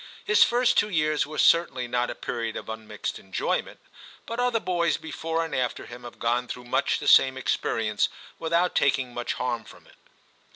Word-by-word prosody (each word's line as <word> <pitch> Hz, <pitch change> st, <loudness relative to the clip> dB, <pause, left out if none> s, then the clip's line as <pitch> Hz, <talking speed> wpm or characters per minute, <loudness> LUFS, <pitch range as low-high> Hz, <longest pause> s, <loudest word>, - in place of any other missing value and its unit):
His 440 Hz, 0 st, +3 dB
first 240 Hz, 0 st, +4 dB
two 210 Hz, -, +1 dB
years 155 Hz, -6 st, +1 dB
were 155 Hz, +1 st, -8 dB
certainly 135 Hz, -7 st, +3 dB
not 120 Hz, 0 st, 0 dB
a -, -, -4 dB
period 115 Hz, -2 st, -4 dB
of -, -, -8 dB
unmixed 110 Hz, -1 st, -5 dB
enjoyment; 95 Hz, -1 st, -2 dB, 0.5 s
but 230 Hz, +1 st, -5 dB
other 245 Hz, -2 st, +2 dB
boys 175 Hz, -4 st, 0 dB
before 160 Hz, +1 st, -3 dB
and 165 Hz, -, -8 dB
after 125 Hz, -1 st, -1 dB
him 120 Hz, 0 st, -11 dB
have 120 Hz, -, -10 dB
gone 120 Hz, +1 st, 0 dB
through 125 Hz, 0 st, -7 dB
much 120 Hz, -, +1 dB
the -, -, -6 dB
same 130 Hz, 0 st, +6 dB
ex 130 Hz, -, +1 dB
perience 105 Hz, -2 st, 0 dB, 0.3 s
without 170 Hz, +2 st, +1 dB
taking 135 Hz, -3 st, +1 dB
much 120 Hz, 0 st, -2 dB
harm 120 Hz, -2 st, -2 dB
from -, -, -16 dB
it. -, -, -21 dB
130 Hz, 190 wpm, -26 LUFS, 120-170 Hz, 0.5 s, same